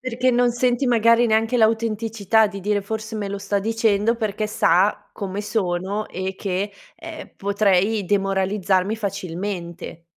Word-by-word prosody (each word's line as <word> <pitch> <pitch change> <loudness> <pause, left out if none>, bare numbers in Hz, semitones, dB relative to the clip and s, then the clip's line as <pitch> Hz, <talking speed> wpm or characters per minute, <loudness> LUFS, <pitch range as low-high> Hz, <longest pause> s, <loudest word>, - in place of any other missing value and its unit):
Perché 255 0 0
non 245 0 +3
senti 245 +2 +1
magari 230 0 +4
neanche 225 +2 +2
l'autenticità 220 -1 +2
di 200 - -7
dire: 205 +1 -1
"Forse 220 +2 -5
me 205 -2 -3
lo 200 - -4
sta 200 0 -1
dicendo 225 0 +1
perché 215 -1 -2
sa 205 0 +2
come 200 0 -4
sono 200 -1 -2
e 190 +1 -4
che, 195 +1 -3 0.2
ehm, - - -10
potrei 200 +1 +1
demoralizzarmi 195 +1 +1
facilmente." 180 -4 -5
205 Hz, 135 wpm, -22 LUFS, 195-225 Hz, 0.2 s, magari